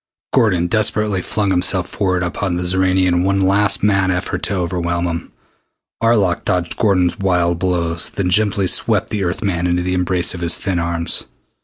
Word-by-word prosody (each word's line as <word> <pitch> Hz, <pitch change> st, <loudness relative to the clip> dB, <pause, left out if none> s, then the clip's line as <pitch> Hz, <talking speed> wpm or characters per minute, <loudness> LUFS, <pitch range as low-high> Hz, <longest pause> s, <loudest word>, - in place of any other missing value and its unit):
Gordon 90 Hz, -6 st, +2 dB
desperately 105 Hz, -1 st, +1 dB
flung 100 Hz, +1 st, -1 dB
himself 90 Hz, 0 st, +1 dB
forward 95 Hz, -3 st, -1 dB
upon 90 Hz, +1 st, -2 dB
the 90 Hz, -, -2 dB
Xoranian 95 Hz, +1 st, +2 dB
in 90 Hz, 0 st, +1 dB
one 95 Hz, +1 st, +1 dB
last 100 Hz, 0 st, +2 dB
mad 100 Hz, -2 st, +2 dB
effort 90 Hz, +1 st, -2 dB
to 100 Hz, -, -2 dB
overwhelm 85 Hz, -1 st, -2 dB
him. 85 Hz, -1 st, -4 dB, 0.7 s
Arlok 105 Hz, -6 st, +2 dB
dodged 90 Hz, -2 st, -1 dB
Gordon's 90 Hz, -6 st, +1 dB
wild 90 Hz, -3 st, +1 dB
blows, 85 Hz, -2 st, -1 dB
then 90 Hz, -2 st, -2 dB
gently 100 Hz, 0 st, +2 dB
swept -, -, +1 dB
the 105 Hz, -2 st, -1 dB
Earth 90 Hz, +4 st, -3 dB
man 90 Hz, -3 st, -1 dB
into 90 Hz, 0 st, 0 dB
the 90 Hz, 0 st, -1 dB
embrace 90 Hz, -1 st, 0 dB
of 90 Hz, -, -7 dB
his 85 Hz, 0 st, +2 dB
thin 95 Hz, -4 st, -2 dB
arms. 85 Hz, 0 st, -1 dB
90 Hz, 175 wpm, -18 LUFS, 85-100 Hz, 0.7 s, Gordon